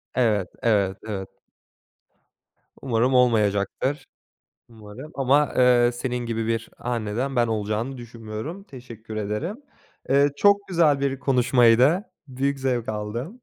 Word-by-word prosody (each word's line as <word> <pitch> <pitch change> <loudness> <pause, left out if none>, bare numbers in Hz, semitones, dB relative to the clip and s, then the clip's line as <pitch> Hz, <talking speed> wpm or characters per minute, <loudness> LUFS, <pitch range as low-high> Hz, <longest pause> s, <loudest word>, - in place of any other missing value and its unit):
Evet, 105 -7 +1
evet, 100 -5 +1
evet. 95 -3 -5 1.5
Umarım 125 0 +1
olmayacaktır, 115 +2 +1 0.6
umarım. 115 +6 -11
Ama, 140 +2 +2
ııı, 125 -1 +5
senin 125 0 -3
gibi 115 -1 -3
bir 115 0 -2
anneden 120 +3 -3
ben 120 -1 +2
olacağını 110 +4 -2
düşünmüyorum, 115 - -8
teşekkür 115 - -11
ederim. 110 - -3 0.5
Iıı, 140 +1 +4
çok 200 0 +3
güzel 165 -6 +3
bir 135 -1 -1
konuşmaydı. 130 - +4 0.2
Büyük 135 +1 -2
zevk 125 -3 -1
aldım. 110 - -4
120 Hz, 110 wpm, -24 LUFS, 110-135 Hz, 1.5 s, ııı